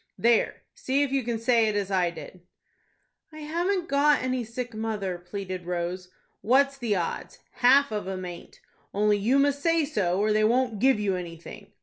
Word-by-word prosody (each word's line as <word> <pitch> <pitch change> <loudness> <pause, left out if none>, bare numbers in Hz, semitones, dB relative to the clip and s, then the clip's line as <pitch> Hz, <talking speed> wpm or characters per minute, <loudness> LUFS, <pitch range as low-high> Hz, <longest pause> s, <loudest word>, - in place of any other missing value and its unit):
"There, 235 -1 +2
see 275 +2 0
if 280 - -2
you 275 0 +1
can 235 -1 -2
say 230 -1 +2
it 215 - -1
as 200 -1 -2
I 180 -2 +2
did." 170 +2 -11 0.9
"I 310 0 -10
haven't 345 +4 -1
got 285 -1 +3
any 255 -1 -1
sick 235 +1 -6
mother," 210 -5 -3
pleaded 185 -1 -6
Rose. 180 +1 -3 0.3
"What's 275 +4 +3
the 230 -5 0
odds? 175 -3 -4 0.2
Half 270 +2 +5
of 210 -1 -3
them 185 -1 -5
aint. 175 -1 -10 0.3
Only 210 0 +2
you 235 +7 +2
must 285 0 +2
say 330 0 +2
so, 195 - -1
or 210 +1 +2
they 215 0 +2
won't 235 -1 +1
give 260 -1 +3
you 200 -2 0
anything. 170 -2 -9
220 Hz, 185 wpm, -26 LUFS, 190-270 Hz, 0.9 s, Half